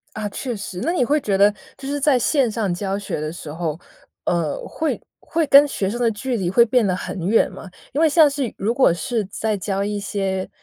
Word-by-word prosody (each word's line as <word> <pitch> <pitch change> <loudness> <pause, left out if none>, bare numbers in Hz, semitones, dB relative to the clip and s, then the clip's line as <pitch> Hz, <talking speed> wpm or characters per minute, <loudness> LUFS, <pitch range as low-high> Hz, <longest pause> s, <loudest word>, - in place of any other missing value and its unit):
啊， 215 -1 -3
确 245 +3 -4
实。 190 -2 -6
那 335 - 0
你 300 - +2
会 300 +3 +2
觉 195 -2 0
得 205 +1 +5 0.2
就 270 - -10
是 285 +1 -2
在 275 -2 +3
线 260 0 +2
上 210 -4 -1
教 195 +2 -2
学 200 -6 -4
的 155 0 -3
时 155 -3 -8
候， 160 -1 -3 0.5
呃， 170 -4 0
会 320 - -2 0.2
会 325 -1 -1
跟 285 +1 +8
学 195 -8 -2
生 240 +3 -4
的 235 -2 +3
距 240 +3 -3
离 180 -3 -1
会 235 +5 +5
变 240 -1 +2
得 180 - +1
很 185 -1 -4
远 225 - +3
吗？ 190 - -10 0.2
因 290 - -1
为 325 - +6
像 310 -1 +6
是 275 -4 -3
如 215 +5 0
果 245 -10 +4
是 230 +4 -2
在 210 +2 -2
教 195 +1 -2
一 205 0 -2
些 190 -1 -2
210 Hz, 250 characters per minute, -21 LUFS, 190-265 Hz, 0.5 s, 跟